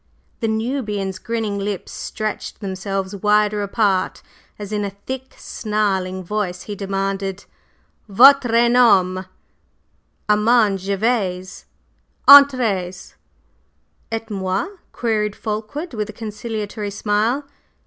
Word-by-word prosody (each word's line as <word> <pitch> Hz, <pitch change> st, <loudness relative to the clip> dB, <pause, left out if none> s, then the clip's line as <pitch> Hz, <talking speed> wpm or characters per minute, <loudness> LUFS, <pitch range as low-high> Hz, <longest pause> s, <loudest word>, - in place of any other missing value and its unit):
The 230 Hz, -, -1 dB
Nubian's 220 Hz, -4 st, -2 dB
grinning 220 Hz, -3 st, -3 dB
lips 200 Hz, -1 st, -4 dB
stretched 215 Hz, -2 st, -5 dB
themselves 195 Hz, 0 st, -4 dB
wider 210 Hz, +1 st, +2 dB
apart 200 Hz, -2 st, 0 dB, 0.3 s
as, 205 Hz, -1 st, -8 dB
in 210 Hz, -1 st, -1 dB
a 200 Hz, -, -2 dB, 0.2 s
thick, 260 Hz, 0 st, -6 dB
snarling 190 Hz, -4 st, -2 dB
voice 180 Hz, -2 st, -3 dB
he 210 Hz, -, -6 dB
demanded: 195 Hz, 0 st, -3 dB, 0.6 s
"Votre 240 Hz, +1 st, +6 dB
nom?" 195 Hz, -7 st, +3 dB, 1.0 s
"Armand 210 Hz, -1 st, +3 dB
Gervase." 195 Hz, -2 st, -2 dB, 0.6 s
"Entrez!" 235 Hz, -11 st, +5 dB, 1.0 s
"Et 225 Hz, 0 st, -3 dB
moi?" 190 Hz, -, -2 dB, 0.2 s
queried 210 Hz, -3 st, -1 dB
Fulkeward, 220 Hz, +9 st, -5 dB
with 215 Hz, -2 st, -3 dB
a -, -, -7 dB
conciliatory 215 Hz, -1 st, -5 dB
smile. 215 Hz, +7 st, 0 dB
210 Hz, 95 wpm, -20 LUFS, 195-225 Hz, 1.0 s, Votre